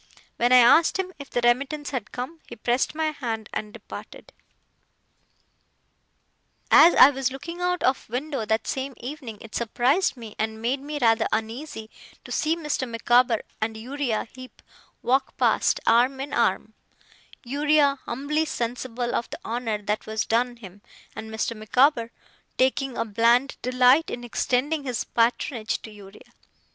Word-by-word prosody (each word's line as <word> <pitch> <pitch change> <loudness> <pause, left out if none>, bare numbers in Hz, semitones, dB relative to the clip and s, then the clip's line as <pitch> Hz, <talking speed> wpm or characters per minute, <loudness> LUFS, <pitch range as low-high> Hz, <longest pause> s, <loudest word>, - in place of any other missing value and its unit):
When 240 +1 +2
I 255 - +8
asked 250 +10 +6
him 375 -1 -3
if 280 - -9
the 245 - -1
remittance 280 +5 0
had 250 -7 -4
come, 260 +7 -6
he - - -9
pressed 240 +6 0
my 315 0 0
hand 230 -7 -5
and 210 - -4
departed. - - -11 2.4
As 330 +4 +8
I 270 - +9
was 265 -2 -1
looking 335 +6 -7
out 360 0 0
of 260 -3 0
window 270 +1 -3
that 220 +1 0
same 265 0 -3
evening, 255 -3 -7
it 225 - -12
surprised 250 - +1
me, 225 -3 -10
and 220 0 -2
made 245 +5 -1
me 295 +2 -6
rather 225 -3 +3
uneasy, 225 0 -4 0.3
to - - -10
see 320 +1 +1
Mr. 300 -6 -3
Micawber 240 0 +2 0.2
and 220 0 -2
Uriah 250 -1 -2
Heep 255 0 -13 0.4
walk 265 +3 0
past, - - +2
arm 250 +4 +3
in 275 +2 -5
arm: - - 0 0.7
Uriah 285 +1 +2
humbly 290 +6 -1
sensible 240 -2 -3
of 235 - -2
the - - -7
honour 230 -2 -2
that 210 +1 -2
was 220 0 -2
done 240 +2 0
him, 200 -4 -13 0.3
and 220 0 -7
Mr. 220 +1 -2
Micawber 235 +3 +2 0.5
taking 265 0 +1
a - - 0
bland 235 +5 +2
delight 255 +5 +4
in 240 - -6
extending 265 +5 -1
his 250 -4 -2
patronage 230 0 0
to 220 - -9
Uriah. 200 -1 -15
250 Hz, 155 wpm, -25 LUFS, 225-280 Hz, 2.4 s, I